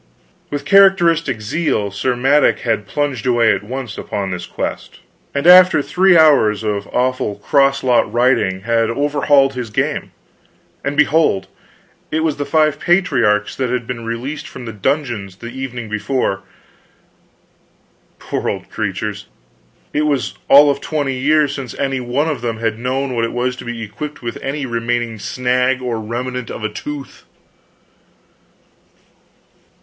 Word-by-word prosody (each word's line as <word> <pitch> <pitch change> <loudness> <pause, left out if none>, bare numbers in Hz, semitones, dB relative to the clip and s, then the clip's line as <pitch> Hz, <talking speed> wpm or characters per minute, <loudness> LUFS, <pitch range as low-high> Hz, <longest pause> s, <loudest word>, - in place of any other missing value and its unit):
With 145 -1 -4
characteristic 170 - +4
zeal 110 -4 -1
Sir 125 +6 -1
Madok 135 +4 +3
had 115 -5 -1
plunged 140 -5 -2
away 120 -2 +4
at - - -3
once 120 +1 -6
upon 100 -2 -4
this 90 -1 -5
quest, - - -5 0.4
and 140 +2 -1
after 180 -4 +7
three 185 +2 +4
hours 135 -10 +4
of 105 -2 -2
awful 125 -4 -1
crosslot 135 -2 +2
riding 120 -6 +1
had 115 +2 +1
overhauled 140 +1 +2
his 125 -3 -5
game. 105 - -2 0.7
And 140 +1 -3
behold, 150 -10 +3 0.6
it 160 - -1
was 160 -2 0
the 145 - -3
five 155 -2 +2
patriarchs 125 - +2
that 130 -2 -1
had 125 -1 -2
been 115 -1 -6
released 120 +6 -5
from 125 - -9
the 115 - -6
dungeons 105 -3 -2
the 115 +4 -9
evening 125 -3 -6
before! 105 -1 -1 1.8
Poor - - -3
old - - -6
creatures, - - -4 0.7
it 150 +1 +1
was 140 -3 -1
all 145 +1 +7
of 140 0 -4
twenty 145 -4 -2
years 150 +1 +2
since 135 -4 -6
any 135 -1 -1
one 125 +5 -1
of 150 -6 -2
them 115 -2 -3
had 115 -1 -2
known 130 +2 -2
what 115 -1 -1
it 115 - -2
was 125 +1 -1
to - - -9
be 120 -1 -5
equipped 145 +7 -7
with 115 - -5
any 140 +1 -3
remaining 120 -1 -2
snag 125 +2 0
or 120 -3 -3
remnant 125 +2 -4
of 110 - -7
a 110 - -1
tooth. 140 +5 -8
125 Hz, 145 wpm, -18 LUFS, 115-145 Hz, 1.8 s, after